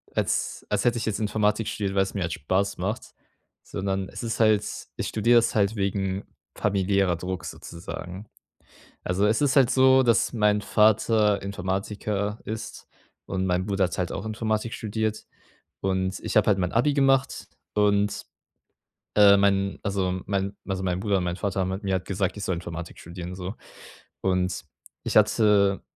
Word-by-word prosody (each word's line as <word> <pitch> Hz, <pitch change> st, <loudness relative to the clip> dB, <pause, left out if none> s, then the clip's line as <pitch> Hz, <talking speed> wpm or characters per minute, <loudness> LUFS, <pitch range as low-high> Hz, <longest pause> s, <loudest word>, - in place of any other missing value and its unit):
als -, -, -1 dB
als 105 Hz, -1 st, 0 dB
hätte 120 Hz, -1 st, +2 dB
ich 115 Hz, -, -2 dB
jetzt 110 Hz, -1 st, -1 dB
Informatik 105 Hz, 0 st, 0 dB
studiert, 100 Hz, -3 st, -2 dB
weil 95 Hz, -, +4 dB
es 95 Hz, -, -7 dB
mir 100 Hz, -, -2 dB
halt 80 Hz, -2 st, -1 dB
Spaß 95 Hz, +6 st, -1 dB
macht, -, -, -3 dB, 0.5 s
sondern 95 Hz, -1 st, -3 dB
es -, -, -7 dB
ist 115 Hz, -1 st, -3 dB
halt 110 Hz, -2 st, +4 dB, 0.3 s
ich -, -, -3 dB
studiere 115 Hz, +3 st, +3 dB
das 115 Hz, 0 st, +3 dB
halt 105 Hz, 0 st, +2 dB
wegen 100 Hz, -1 st, -1 dB, 0.3 s
familiärer 95 Hz, -3 st, +1 dB
Druck 90 Hz, 0 st, -5 dB
sozusagen. 90 Hz, +4 st, -8 dB, 0.8 s
Also 90 Hz, +3 st, +1 dB
es 110 Hz, +4 st, +2 dB
ist 140 Hz, -2 st, +2 dB
halt 130 Hz, -3 st, +5 dB
so, 130 Hz, 0 st, +5 dB
dass 115 Hz, -2 st, +3 dB
mein 105 Hz, -3 st, +2 dB
Vater 105 Hz, 0 st, +3 dB
Informatiker 100 Hz, +2 st, -3 dB
ist, 110 Hz, 0 st, -6 dB, 0.4 s
und 95 Hz, -1 st, -2 dB
mein 90 Hz, 0 st, 0 dB
Bruder 100 Hz, -2 st, +1 dB
hat 85 Hz, -, -5 dB
halt 90 Hz, -2 st, -1 dB
auch -, -, -5 dB
Informatik 110 Hz, +1 st, -2 dB
studiert. 110 Hz, 0 st, -3 dB, 0.6 s
Und 95 Hz, 0 st, -1 dB
ich -, -, -5 dB
habe 105 Hz, -, +3 dB
halt 105 Hz, -, +4 dB
mein 90 Hz, -2 st, -1 dB
Abi 130 Hz, +6 st, +2 dB
gemacht 135 Hz, -2 st, +2 dB, 0.3 s
und, 105 Hz, -1 st, +2 dB, 0.9 s
ähm, 100 Hz, -1 st, +7 dB
mein, 100 Hz, -1 st, +1 dB
also, 95 Hz, -2 st, -1 dB
mein 100 Hz, 0 st, -1 dB
also, 95 Hz, -1 st, -3 dB
mein 90 Hz, -1 st, -1 dB
Bruder 100 Hz, -1 st, +1 dB
und 90 Hz, -, -1 dB
mein 90 Hz, 0 st, -1 dB
Vater 100 Hz, 0 st, -2 dB
haben 95 Hz, 0 st, 0 dB
halt 95 Hz, +3 st, -5 dB
mir 95 Hz, -1 st, +1 dB
gesagt, 95 Hz, +1 st, -2 dB
ich 105 Hz, -, -5 dB
soll 95 Hz, -, 0 dB
Informatik 85 Hz, 0 st, -7 dB
studieren 85 Hz, +1 st, -7 dB
so. 95 Hz, +3 st, -6 dB, 0.7 s
Und 90 Hz, -1 st, 0 dB, 0.4 s
ich -, -, +1 dB
hatte 100 Hz, -3 st, +4 dB
100 Hz, 170 wpm, -25 LUFS, 95-110 Hz, 0.9 s, ähm